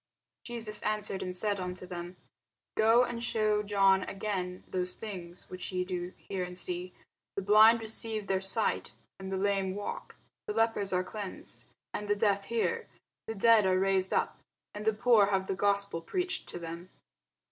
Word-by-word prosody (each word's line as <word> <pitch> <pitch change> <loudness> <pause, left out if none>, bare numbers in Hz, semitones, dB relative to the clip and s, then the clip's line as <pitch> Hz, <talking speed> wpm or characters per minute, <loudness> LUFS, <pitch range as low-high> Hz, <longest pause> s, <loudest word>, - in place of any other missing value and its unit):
Jesus 230 -3 -4
answered 210 -2 -1
and 180 0 -3
said 205 +1 0
unto 180 0 -4
them, 175 0 -6 0.6
Go 225 +3 +5
and 235 -1 -3
shew 215 -2 +2
John 195 -2 +4
again 185 -3 -3
those 180 -1 0
things 180 -5 -8
which 185 +1 -5
ye 180 0 -1
do 180 -1 -4
hear 190 -2 -4
and 180 0 -6
see: 180 0 -3 0.4
the 195 - -2
blind 215 +3 +7
receive 220 -1 -2
their 190 -1 0
sight, 195 +3 -1 0.2
and 190 0 -6
the 190 - 0
lame 195 -1 0
walk, 205 - -5 0.3
the 425 - -1
lepers 225 -3 +1
are 180 0 +2
cleansed, 200 +1 -8 0.3
and 210 - -4
the 205 - +2
deaf 200 -1 +2
hear, 230 +1 -1 0.4
the 225 - -3
dead 220 -1 +5
are 185 0 +3
raised 190 -1 +2
up, - - 0 0.3
and 210 +1 -6
the 220 - +4
poor 220 -2 +5
have 195 -1 +1
the 195 - -1
gospel 200 -3 0
preached 365 - -2
to - - -6
them. 170 +1 -7
195 Hz, 170 wpm, -31 LUFS, 185-215 Hz, 0.6 s, blind